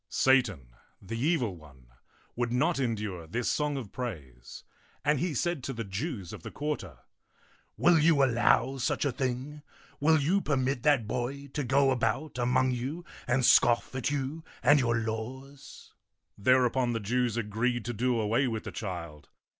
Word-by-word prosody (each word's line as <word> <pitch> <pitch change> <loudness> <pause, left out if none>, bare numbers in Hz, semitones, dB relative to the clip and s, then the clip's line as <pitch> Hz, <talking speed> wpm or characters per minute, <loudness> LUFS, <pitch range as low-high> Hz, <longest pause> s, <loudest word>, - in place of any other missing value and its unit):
Satan, 105 - +2 0.3
the 100 +4 -7
evil 125 - 0
one, 70 -6 -17 0.5
would 120 -1 -1
not 145 +6 +1
endure 105 -9 -3
this 120 +8 -2
song 150 -1 0
of 115 -7 -7
praise; 70 - -7 0.4
and 150 -1 +3
he 170 -3 -1
said 175 0 -1
to 135 - -3
the 115 -1 -4
Jews 100 - -5
of - - -8
the - - -7
quarter, 145 - -4 0.4
" - - -34
Will 170 -1 +5
you 155 -2 +4
allow 125 +1 +3
such 130 - 0
a 140 - +1
thing? 130 +3 -3 0.4
Will 160 +2 +4
you 175 +8 +2
permit 135 -4 0
that 140 -4 +3
boy 135 +4 -3
to 145 - -1
go 135 +2 +3
about 130 +3 -1
among 125 +1 +2
you 135 +8 -4 0.2
and 125 +1 +2
scoff 120 +1 +4
at 130 +1 -1
you 145 +3 -3 0.2
and 145 0 +6
your 120 -2 +1
laws? 130 +5 -6 0.2
" - - -54
Thereupon 125 +2 +2
the 115 - -1
Jews 120 +2 0
agreed 115 +2 -1
to 120 - -3
do 120 +1 0
away 115 +5 +1
with 110 -2 -3
the - - -6
child. 85 -7 -7
125 Hz, 170 wpm, -29 LUFS, 110-140 Hz, 0.5 s, and